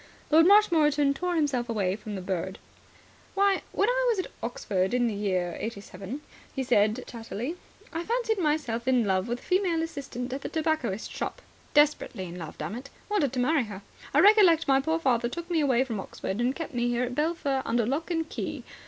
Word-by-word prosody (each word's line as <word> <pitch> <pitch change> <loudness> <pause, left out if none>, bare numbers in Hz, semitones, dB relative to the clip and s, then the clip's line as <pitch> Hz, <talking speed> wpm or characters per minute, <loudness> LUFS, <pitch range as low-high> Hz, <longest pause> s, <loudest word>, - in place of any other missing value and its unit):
Lord 325 +2 +7
Marshmoreton 305 -8 +5
tore 355 +5 -2
himself 275 -7 0
away 195 -5 0
from 210 -1 -7
the 190 - -5
bird. 190 0 -3 0.8
"Why, 395 0 +3
when 410 - +1
I - - +2
was 455 - +2
at 370 - -3
Oxford 200 -3 -1
in 245 -1 +2
the 230 - 0
year 185 -4 -1
'87," 205 +3 -6 0.3
he 265 - -1
said 220 -1 +2
chattily, 235 - -5 0.4
"I 330 +1 -2
fancied 460 0 0
myself 295 -8 0
in 250 -3 +3
love 190 +1 +1
with 240 +1 -1
the - - -17
female 360 -3 +1
assistant 270 -6 -5
at 275 - -5
a - - -3
tobacconist 310 -10 -1
shop. - - -4 0.4
Desperately 295 -9 +3
in 175 0 -8
love, 160 -3 -8
dammit. 230 - -6 0.2
Wanted 330 - +1
to 255 - -1
marry 270 +1 +2
her. 200 -2 -9 0.3
I - - +5
recollect 380 -7 +6
my 270 0 +4
poor 320 +3 0
father 240 -6 +1
took 340 +6 -6
me 335 - +2
away 260 -4 +3
from 230 -6 -4
Oxford 195 +2 -4
and 250 +3 +1
kept 330 -4 -6
me 240 0 0
here 240 0 +1
at 250 0 -3
Belpher 295 -2 0
under 230 0 +1
lock 285 +9 -2
and 325 -2 -1
key. - - -5
265 Hz, 195 wpm, -27 LUFS, 225-325 Hz, 0.8 s, Lord